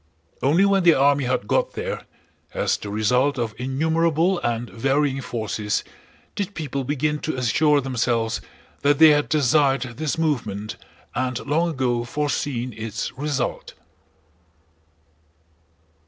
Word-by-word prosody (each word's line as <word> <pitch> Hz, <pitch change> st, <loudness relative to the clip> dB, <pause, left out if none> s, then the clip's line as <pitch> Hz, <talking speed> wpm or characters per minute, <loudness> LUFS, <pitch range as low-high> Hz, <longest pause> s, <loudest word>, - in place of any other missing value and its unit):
Only 165 Hz, +8 st, +4 dB
when 200 Hz, -1 st, +3 dB
the 175 Hz, -2 st, +6 dB
army 140 Hz, 0 st, +3 dB
had 125 Hz, -4 st, -1 dB
got -, -, +1 dB
there, -, -, -5 dB, 0.5 s
as -, -, +1 dB
the 105 Hz, -, -7 dB
result 125 Hz, +7 st, +1 dB
of 115 Hz, -3 st, -2 dB
innumerable 160 Hz, +6 st, +1 dB
and 120 Hz, -4 st, -2 dB
varying 135 Hz, +3 st, 0 dB
forces, 110 Hz, -4 st, -2 dB, 0.5 s
did 200 Hz, 0 st, -3 dB
people 140 Hz, -4 st, -3 dB
begin 150 Hz, +2 st, -1 dB
to 155 Hz, -, -3 dB
assure 145 Hz, +4 st, +3 dB
themselves 120 Hz, -3 st, -1 dB, 0.4 s
that 145 Hz, 0 st, +3 dB
they 160 Hz, +1 st, +8 dB
had 145 Hz, -1 st, +3 dB
desired 140 Hz, -2 st, +3 dB
this 155 Hz, -1 st, -2 dB
movement 110 Hz, -10 st, -2 dB, 0.4 s
and 125 Hz, 0 st, -1 dB
long 160 Hz, +4 st, +1 dB
ago 125 Hz, -5 st, 0 dB
foreseen 130 Hz, -2 st, -2 dB
its 110 Hz, 0 st, -4 dB
result. 145 Hz, 0 st, -3 dB
135 Hz, 125 wpm, -23 LUFS, 120-150 Hz, 0.5 s, they